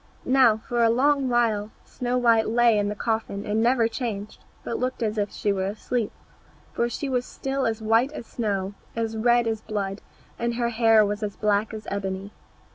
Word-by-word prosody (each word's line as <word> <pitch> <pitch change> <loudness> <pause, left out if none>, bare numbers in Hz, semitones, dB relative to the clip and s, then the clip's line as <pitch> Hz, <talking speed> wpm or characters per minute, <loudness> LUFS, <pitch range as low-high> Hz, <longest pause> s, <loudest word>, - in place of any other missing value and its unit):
Now, 255 -4 +5
for 240 -1 +1
a 230 - +5
long 270 +3 +2
while 225 -4 +1 0.2
Snow 250 0 -2
white 230 -3 +3
lay 235 -1 +4
in 205 0 0
the 210 - -3
coffin 220 -2 -2
and 215 +1 0
never 235 -1 +3
changed, 225 -4 -5 0.2
but 235 - -3
looked 255 -1 -2
as 215 -1 -1
if 205 0 0
she 205 - 0
were 190 -1 -1
asleep, 220 +2 -2 0.6
for 235 - 0
she 280 - -4
was 250 -2 0
still 270 +1 -2
as 220 -1 -3
white 225 +5 +3
as 300 - -7
snow, 200 -5 -2 0.2
as 225 -1 -2
red 240 +1 +3
as 220 -1 -1
blood, 200 -2 -4 0.4
and 235 0 -1
her 235 0 0
hair 225 -2 +5
was 205 +1 -3
as 205 -2 -3
black 210 0 +1
as 215 -1 -7
ebony. 195 0 -4
225 Hz, 195 wpm, -25 LUFS, 210-240 Hz, 0.6 s, Now